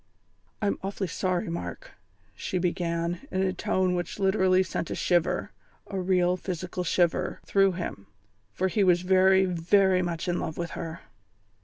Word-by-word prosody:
"I'm 200 Hz, -, 0 dB
awfully 195 Hz, 0 st, -3 dB
sorry, 185 Hz, +1 st, -1 dB
Mark," 170 Hz, -, -6 dB, 0.4 s
she 185 Hz, -, -3 dB
began, 175 Hz, +4 st, -1 dB
in 190 Hz, 0 st, 0 dB
a 190 Hz, -1 st, 0 dB
tone 185 Hz, 0 st, 0 dB
which 175 Hz, -1 st, -3 dB
literally 190 Hz, -2 st, +3 dB
sent 170 Hz, -2 st, -4 dB
a -, -, -3 dB
shiver 175 Hz, -2 st, +1 dB, 0.3 s
a 195 Hz, -, -4 dB
real 180 Hz, -1 st, +2 dB
physical 180 Hz, 0 st, -4 dB
shiver 175 Hz, -1 st, +1 dB
through 195 Hz, -1 st, +3 dB
him, 170 Hz, -, -6 dB, 0.4 s
for 185 Hz, +12 st, 0 dB
he 200 Hz, +2 st, +1 dB
was 180 Hz, -1 st, +4 dB
very, 190 Hz, +1 st, +5 dB
very 185 Hz, +2 st, +3 dB
much 175 Hz, -1 st, -3 dB
in 175 Hz, 0 st, 0 dB
love 160 Hz, -, -4 dB
with 170 Hz, -1 st, -3 dB
her. 165 Hz, 0 st, -6 dB
180 Hz, 155 wpm, -27 LUFS, 175-190 Hz, 0.4 s, very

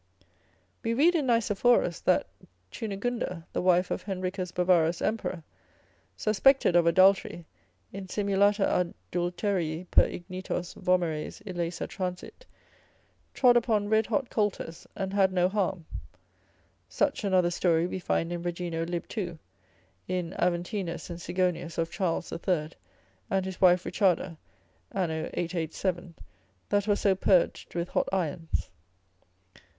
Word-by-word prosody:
We 230 Hz, 0 st, -1 dB
read 320 Hz, +7 st, +5 dB
in 305 Hz, -6 st, 0 dB
Nicephorus, 230 Hz, -5 st, +2 dB
that -, -, +3 dB, 0.5 s
Chunegunda 205 Hz, -4 st, -3 dB
the -, -, 0 dB
wife 180 Hz, 0 st, +3 dB
of -, -, -1 dB
Henricus 185 Hz, -1 st, -3 dB
Bavarus 175 Hz, -2 st, +2 dB
emperor, 190 Hz, -6 st, -2 dB, 0.7 s
suspected 220 Hz, -1 st, +3 dB
of 170 Hz, -1 st, +5 dB
adultery, 185 Hz, -1 st, +4 dB, 0.5 s
insimulata 200 Hz, +1 st, +1 dB, 0.5 s
adulterii 175 Hz, -1 st, -1 dB
per -, -, +6 dB
ignitos 180 Hz, -1 st, -5 dB
vomeres 175 Hz, -3 st, -1 dB
illaesa 175 Hz, -3 st, -3 dB
transiit, 185 Hz, -, -6 dB, 0.9 s
trod 250 Hz, -2 st, +5 dB
upon 215 Hz, -3 st, +2 dB
red 220 Hz, 0 st, +3 dB
hot 270 Hz, -4 st, -1 dB
coulters, 205 Hz, -6 st, -2 dB
and 190 Hz, 0 st, -3 dB
had 195 Hz, -2 st, +3 dB
no 180 Hz, -1 st, +3 dB
harm: 190 Hz, -3 st, -1 dB, 1.0 s
such -, -, 0 dB
another 185 Hz, -3 st, +3 dB
story 170 Hz, -1 st, +2 dB
we 185 Hz, +1 st, -3 dB
find 170 Hz, -1 st, -1 dB
in 175 Hz, -, -4 dB
Regino 170 Hz, -1 st, -3 dB
lib. 175 Hz, -1 st, -3 dB
2. 175 Hz, -6 st, -4 dB, 0.7 s
In 180 Hz, -2 st, -2 dB
Aventinus 175 Hz, 0 st, -2 dB
and 170 Hz, -, -6 dB
Sigonius 175 Hz, -2 st, -1 dB
of 165 Hz, 0 st, -1 dB
Charles 175 Hz, -2 st, -1 dB
the -, -, -4 dB
Third 165 Hz, -5 st, -1 dB, 0.5 s
and 190 Hz, -1 st, 0 dB
his 190 Hz, -1 st, -6 dB
wife 180 Hz, -1 st, +5 dB
Richarda, 185 Hz, -4 st, +1 dB, 0.5 s
an. 185 Hz, -4 st, -1 dB
887, 170 Hz, +2 st, -3 dB, 0.5 s
that 205 Hz, 0 st, +1 dB
was 205 Hz, -1 st, +2 dB
so 200 Hz, -, +4 dB
purged 185 Hz, -2 st, +1 dB
with 170 Hz, +1 st, -2 dB
hot -, -, 0 dB
irons. 165 Hz, -, -2 dB
185 Hz, 125 wpm, -28 LUFS, 175-200 Hz, 1.0 s, per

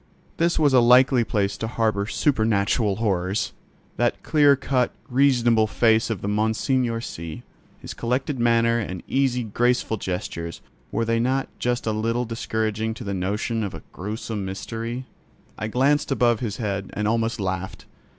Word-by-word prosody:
This 170 Hz, +1 st, +2 dB
was 145 Hz, -3 st, +3 dB
a 130 Hz, -, +7 dB
likely 125 Hz, +1 st, +5 dB
place 100 Hz, -3 st, 0 dB
to 110 Hz, -, -3 dB
harbour 110 Hz, -3 st, 0 dB
supernatural 110 Hz, -5 st, +1 dB
horrors! 95 Hz, -2 st, -1 dB, 0.4 s
That -, -, 0 dB
clear 145 Hz, -2 st, +5 dB
cut, 130 Hz, -2 st, 0 dB, 0.2 s
reasonable 120 Hz, -4 st, +3 dB
face 110 Hz, +1 st, +3 dB
of 110 Hz, -5 st, -3 dB
Monseigneur 115 Hz, +3 st, 0 dB
C——, 80 Hz, -7 st, -7 dB, 0.3 s
his -, -, -8 dB
collected 125 Hz, +3 st, -2 dB
manner 115 Hz, 0 st, +3 dB
and 95 Hz, -5 st, -5 dB
easy, 130 Hz, -2 st, +1 dB
graceful 120 Hz, +1 st, 0 dB
gestures, 90 Hz, -3 st, -5 dB, 0.3 s
were 115 Hz, -, 0 dB
they 115 Hz, 0 st, +1 dB
not 130 Hz, +3 st, 0 dB
just 125 Hz, 0 st, -1 dB
a 110 Hz, -, +1 dB
little 115 Hz, +3 st, -1 dB
discouraging 110 Hz, -1 st, -2 dB
to -, -, -8 dB
the 100 Hz, -, -3 dB
notion 105 Hz, +4 st, -1 dB
of 100 Hz, -5 st, -4 dB
a 80 Hz, -, -10 dB
gruesome 105 Hz, +1 st, -5 dB
mystery? 115 Hz, +6 st, -5 dB, 0.5 s
I 110 Hz, -, -4 dB
glanced 140 Hz, +6 st, +2 dB
above 120 Hz, -4 st, +3 dB
his 110 Hz, -5 st, -3 dB
head, 100 Hz, -4 st, -3 dB
and 105 Hz, 0 st, -1 dB
almost 115 Hz, +1 st, 0 dB
laughed. 95 Hz, -1 st, -4 dB
115 Hz, 150 wpm, -24 LUFS, 105-125 Hz, 0.5 s, a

